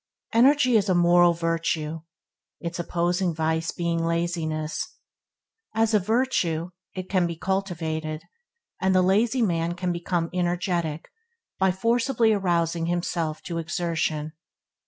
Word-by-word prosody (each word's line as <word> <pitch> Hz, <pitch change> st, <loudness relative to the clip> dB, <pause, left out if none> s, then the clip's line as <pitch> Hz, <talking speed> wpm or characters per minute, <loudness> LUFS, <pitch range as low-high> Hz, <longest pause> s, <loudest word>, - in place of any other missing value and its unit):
Energy 255 Hz, +1 st, +5 dB
is 205 Hz, -1 st, 0 dB
a 185 Hz, -, +3 dB
moral 175 Hz, 0 st, +5 dB
virtue, 165 Hz, -2 st, -1 dB, 0.6 s
its 170 Hz, +1 st, -5 dB
opposing 175 Hz, 0 st, 0 dB
vice 160 Hz, +1 st, 0 dB
being 170 Hz, -1 st, -1 dB
laziness. 165 Hz, -2 st, -2 dB, 0.8 s
As 225 Hz, 0 st, +2 dB
a 210 Hz, -, +5 dB
virtue, 185 Hz, -6 st, 0 dB, 0.2 s
it 185 Hz, -1 st, -5 dB
can 185 Hz, -3 st, +2 dB
be 170 Hz, -, -4 dB
cultivated, 160 Hz, -4 st, -2 dB, 0.6 s
and 190 Hz, 0 st, +2 dB
the 185 Hz, -, +5 dB
lazy 220 Hz, +7 st, +2 dB
man 170 Hz, -3 st, 0 dB
can 180 Hz, 0 st, -2 dB
become 170 Hz, -1 st, -2 dB
energetic 175 Hz, -3 st, -1 dB, 0.5 s
by 190 Hz, 0 st, +4 dB
forcibly 230 Hz, +3 st, +2 dB
arousing 170 Hz, -4 st, 0 dB
himself 170 Hz, -2 st, -2 dB
to 170 Hz, -2 st, -3 dB
exertion. 160 Hz, -2 st, -2 dB
175 Hz, 120 wpm, -25 LUFS, 165-190 Hz, 0.8 s, Energy